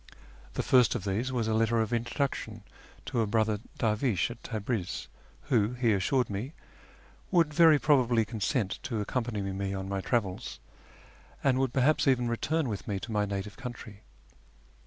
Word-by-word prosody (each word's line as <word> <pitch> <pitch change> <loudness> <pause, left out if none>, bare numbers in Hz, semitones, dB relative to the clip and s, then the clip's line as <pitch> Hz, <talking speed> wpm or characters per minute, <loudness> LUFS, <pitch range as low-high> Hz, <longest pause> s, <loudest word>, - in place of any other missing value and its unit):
The - - -1
first 125 -3 +4
of - - -3
these 105 +7 -1
was 120 -3 -1
a 110 - +1
letter 115 +1 +2
of 110 +1 0
introduction 115 -2 -2 0.4
to 120 - 0
a 110 - 0
brother 110 0 +1 0.2
dervish 110 -1 +1
at 120 - -10
Tabriz, 110 -4 -3 0.4
who, 120 -5 +1
he 120 -3 +2
assured 115 +6 +1
me, 105 +9 -4 0.8
would 165 -4 +3
very 160 -1 +7
probably 125 -6 +3
consent 110 -1 -1
to 115 -4 -3
accompany 110 -1 -2
me 95 0 -3
on 95 0 -4
my 100 0 -2
travels, 110 -1 -2 0.8
and 130 -2 +3
would 135 -2 +1
perhaps 140 +4 +2
even 125 -2 +3
return 145 +6 0
with 105 -4 -5
me 100 -3 -2
to 115 - -7
my 105 -1 +1
native 100 0 -5
country. 120 -5 -8
115 Hz, 160 wpm, -29 LUFS, 105-130 Hz, 0.8 s, very